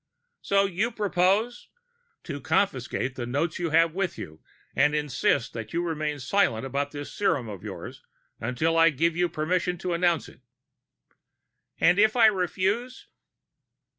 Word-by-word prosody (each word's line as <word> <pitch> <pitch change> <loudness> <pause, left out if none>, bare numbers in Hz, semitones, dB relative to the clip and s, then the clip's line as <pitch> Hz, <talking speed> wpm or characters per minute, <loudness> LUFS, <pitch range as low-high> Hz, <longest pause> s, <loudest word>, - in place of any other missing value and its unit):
"So 200 0 +2
you 195 +4 -1
propose 210 +2 0 0.3
" 475 -1 -45
"To 145 0 -6
confiscate 135 -5 0
the 120 -2 -5
notes 150 +7 -1
you 170 -1 -1
have 165 +1 +3
with 190 -1 -2
you, 80 0 -9 0.3
and 145 +2 +3
to 150 - +2
insist 140 -3 0
that 115 -2 -7
you 170 +1 0
remain 155 -3 -2
silent 130 - +1
about 140 +2 -2
this 145 0 -8
serum 145 - 0
of 100 -4 -8
yours - - -8 0.4
until 125 +8 0
I 165 0 +7
give 165 +3 0
you 175 0 +1
permission 175 +3 -1
to 180 0 -3
announce 170 -2 +1
it." - - -17 1.4
"And 175 +3 +4
if 215 +2 +4
I 235 -2 +6
refuse?" 200 +5 0
165 Hz, 155 wpm, -26 LUFS, 145-195 Hz, 1.4 s, I